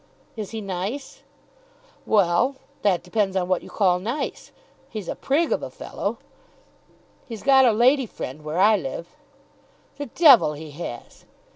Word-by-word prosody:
"Is 215 Hz, -3 st, -5 dB
he 225 Hz, -1 st, -5 dB
nice?" 195 Hz, +8 st, -5 dB, 0.9 s
"Well; 205 Hz, +6 st, +3 dB, 0.3 s
that 195 Hz, -4 st, +1 dB
depends 195 Hz, +1 st, -1 dB
on 180 Hz, -2 st, 0 dB
what 185 Hz, -1 st, +1 dB
you -, -, -12 dB
call 180 Hz, -4 st, +2 dB
nice. 240 Hz, +9 st, -4 dB, 0.4 s
He's 215 Hz, -5 st, -6 dB
a -, -, -2 dB
prig 310 Hz, +5 st, 0 dB
of -, -, +1 dB
a -, -, -5 dB
fellow." -, -, -5 dB, 1.1 s
"He's 225 Hz, -4 st, -8 dB
got 270 Hz, -1 st, +6 dB
a 240 Hz, -, +5 dB
lady 250 Hz, +4 st, +3 dB
friend 150 Hz, -5 st, -7 dB
where 155 Hz, +2 st, -4 dB
I 210 Hz, +3 st, +5 dB
live." 165 Hz, +1 st, -6 dB, 0.9 s
"The 285 Hz, 0 st, -5 dB
devil 255 Hz, -, +6 dB
he 155 Hz, +1 st, -9 dB
has!" 145 Hz, -6 st, -8 dB
205 Hz, 150 wpm, -23 LUFS, 180-250 Hz, 1.1 s, got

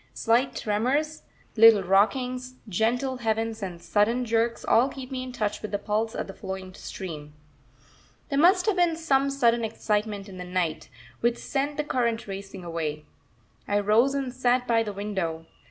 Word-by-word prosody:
Slight 240 Hz, +4 st, +2 dB
tremors, 265 Hz, +9 st, 0 dB, 0.3 s
little 225 Hz, -3 st, +7 dB
rockings, 250 Hz, +7 st, +1 dB
gentle 245 Hz, +7 st, 0 dB
heaves, 225 Hz, -1 st, -1 dB
and 180 Hz, -3 st, -5 dB
sudden 225 Hz, +7 st, +1 dB
jerks, 230 Hz, 0 st, 0 dB
all 245 Hz, +4 st, +4 dB
keep 265 Hz, -1 st, -9 dB
me 260 Hz, -1 st, -3 dB
in 255 Hz, 0 st, -6 dB
touch 215 Hz, -4 st, -2 dB
with 215 Hz, -, -5 dB
the 205 Hz, -, -1 dB
pulse 215 Hz, +3 st, -1 dB
of -, -, -2 dB
the 195 Hz, -, -9 dB
flowing 190 Hz, -1 st, -7 dB
stream. 150 Hz, -6 st, -8 dB, 0.9 s
There 280 Hz, -2 st, +1 dB
must 360 Hz, +3 st, +5 dB
have 425 Hz, -4 st, +1 dB
been 345 Hz, -2 st, +3 dB
some 280 Hz, -4 st, +2 dB
sudden 235 Hz, -4 st, +2 dB
excitement 210 Hz, -2 st, -2 dB
in 185 Hz, -2 st, -10 dB
the -, -, -4 dB
night, 175 Hz, -4 st, -2 dB, 0.3 s
which 235 Hz, 0 st, +1 dB
sent 285 Hz, +2 st, -2 dB
the 300 Hz, -, 0 dB
current 235 Hz, -5 st, -1 dB
racing 195 Hz, -1 st, -7 dB
away. 155 Hz, -3 st, -4 dB, 0.6 s
I 205 Hz, 0 st, +2 dB
rose 225 Hz, +7 st, +3 dB
and 270 Hz, -3 st, -2 dB
sat 250 Hz, -1 st, +1 dB
by 230 Hz, -2 st, +3 dB
the 215 Hz, -2 st, -3 dB
window. 190 Hz, -5 st, -3 dB
225 Hz, 170 wpm, -26 LUFS, 200-255 Hz, 0.9 s, little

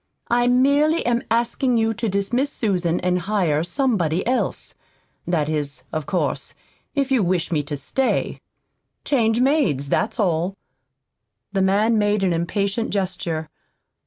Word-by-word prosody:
"I 240 Hz, 0 st, +3 dB
merely 280 Hz, +6 st, +3 dB
am 240 Hz, 0 st, +1 dB
asking 235 Hz, +2 st, +1 dB
you 225 Hz, 0 st, +1 dB
to 230 Hz, 0 st, -2 dB
dismiss 235 Hz, +8 st, 0 dB
Susan 180 Hz, -6 st, 0 dB
and 180 Hz, 0 st, +1 dB
hire 175 Hz, -6 st, 0 dB
somebody 180 Hz, -, 0 dB
else 255 Hz, +1 st, -1 dB, 0.5 s
that 165 Hz, -4 st, +1 dB
is, 145 Hz, -4 st, -3 dB
of 155 Hz, -3 st, -3 dB
course, 185 Hz, -, -2 dB, 0.4 s
if 275 Hz, -1 st, 0 dB
you 260 Hz, -4 st, +4 dB
wish 180 Hz, -2 st, 0 dB
me 155 Hz, -3 st, +1 dB
to 145 Hz, 0 st, -5 dB
stay. 265 Hz, -, -1 dB, 0.7 s
Change 230 Hz, -4 st, +2 dB
maids, 200 Hz, -, +1 dB
that's 215 Hz, -, 0 dB
all." 180 Hz, 0 st, 0 dB, 1.0 s
The 195 Hz, -, +1 dB
man 210 Hz, +4 st, +3 dB
made 205 Hz, -1 st, +1 dB
an 180 Hz, -2 st, +2 dB
impatient 200 Hz, +6 st, -1 dB
gesture. 180 Hz, -5 st, -2 dB
200 Hz, 135 wpm, -22 LUFS, 170-240 Hz, 1.0 s, you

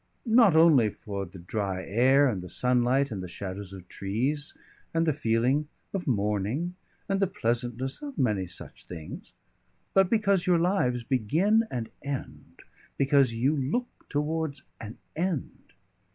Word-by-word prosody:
Not 225 Hz, -6 st, +5 dB
only 155 Hz, -9 st, +6 dB
for 100 Hz, -1 st, -6 dB
the 95 Hz, -, -12 dB
dry 95 Hz, +1 st, -3 dB
air 130 Hz, +6 st, +4 dB
and 105 Hz, -8 st, -1 dB
the 90 Hz, -, -9 dB
sunlight, 125 Hz, +5 st, +2 dB
and 100 Hz, -4 st, -4 dB
the 90 Hz, -, -5 dB
shadows 95 Hz, +2 st, -6 dB
of 95 Hz, -2 st, -10 dB
trees, 130 Hz, +10 st, -1 dB, 0.4 s
and 165 Hz, 0 st, +3 dB
the 155 Hz, -, +2 dB
feeling 130 Hz, +2 st, +1 dB, 0.3 s
of 190 Hz, -4 st, -3 dB
morning, 105 Hz, -, 0 dB, 0.3 s
and 195 Hz, -1 st, 0 dB
the 195 Hz, -, +3 dB
pleasantness 120 Hz, -, -2 dB
of 285 Hz, -2 st, -7 dB
many 105 Hz, -7 st, +1 dB
such 90 Hz, -, -9 dB
things, 80 Hz, -4 st, -9 dB, 0.6 s
but 195 Hz, -2 st, +5 dB
because 200 Hz, -5 st, +2 dB
your 180 Hz, -1 st, +5 dB
lives 165 Hz, -9 st, +1 dB
begin 165 Hz, -, +2 dB
and 115 Hz, -3 st, -4 dB
end 140 Hz, -2 st, -7 dB, 0.3 s
because 135 Hz, -3 st, +3 dB
you 130 Hz, +7 st, +2 dB
look 155 Hz, -, -3 dB
towards 150 Hz, -1 st, -2 dB, 0.2 s
an 110 Hz, 0 st, -8 dB, 0.2 s
end." 170 Hz, -3 st, -3 dB
130 Hz, 145 wpm, -28 LUFS, 105-165 Hz, 0.6 s, only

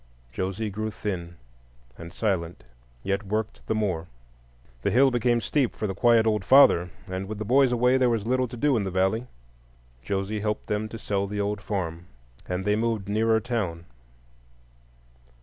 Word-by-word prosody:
Josie 95 Hz, +6 st, -3 dB
grew 110 Hz, +2 st, -3 dB
thin 90 Hz, -5 st, -5 dB, 0.6 s
and 85 Hz, 0 st, -10 dB
silent, 90 Hz, -6 st, -2 dB, 0.4 s
yet 100 Hz, 0 st, 0 dB
worked 110 Hz, +2 st, -3 dB
the 110 Hz, -, 0 dB
more. 90 Hz, -6 st, -1 dB, 0.7 s
The -, -, +1 dB
hill 135 Hz, +3 st, +4 dB
became 120 Hz, 0 st, +2 dB
steep 135 Hz, 0 st, 0 dB
for 110 Hz, -, -3 dB
the 95 Hz, -, -2 dB
quiet 115 Hz, +2 st, +4 dB
old 105 Hz, -3 st, +1 dB
father, 90 Hz, -9 st, +6 dB, 0.2 s
and 95 Hz, +1 st, -4 dB
with 110 Hz, +1 st, -5 dB
the 110 Hz, -, -4 dB
boys 130 Hz, +3 st, +4 dB
away 125 Hz, +2 st, +3 dB
there 125 Hz, -1 st, +4 dB
was 115 Hz, -3 st, -1 dB
little 130 Hz, +1 st, +1 dB
to 120 Hz, +1 st, -9 dB
do 145 Hz, +2 st, +2 dB
in 110 Hz, -, +1 dB
the 95 Hz, -, -2 dB
valley. 95 Hz, +6 st, 0 dB, 0.7 s
Josie 100 Hz, -, -2 dB
helped 105 Hz, 0 st, -2 dB
them 105 Hz, +1 st, -2 dB
to 115 Hz, -, -7 dB
sell 100 Hz, -2 st, -2 dB
the 105 Hz, +1 st, -4 dB
old 105 Hz, +1 st, -1 dB
farm, 90 Hz, -5 st, -4 dB, 0.4 s
and 90 Hz, +1 st, -3 dB
they 105 Hz, 0 st, +2 dB
moved 110 Hz, -2 st, -1 dB
nearer 110 Hz, +2 st, +2 dB
town. 100 Hz, -8 st, -3 dB
105 Hz, 170 wpm, -26 LUFS, 95-115 Hz, 0.7 s, father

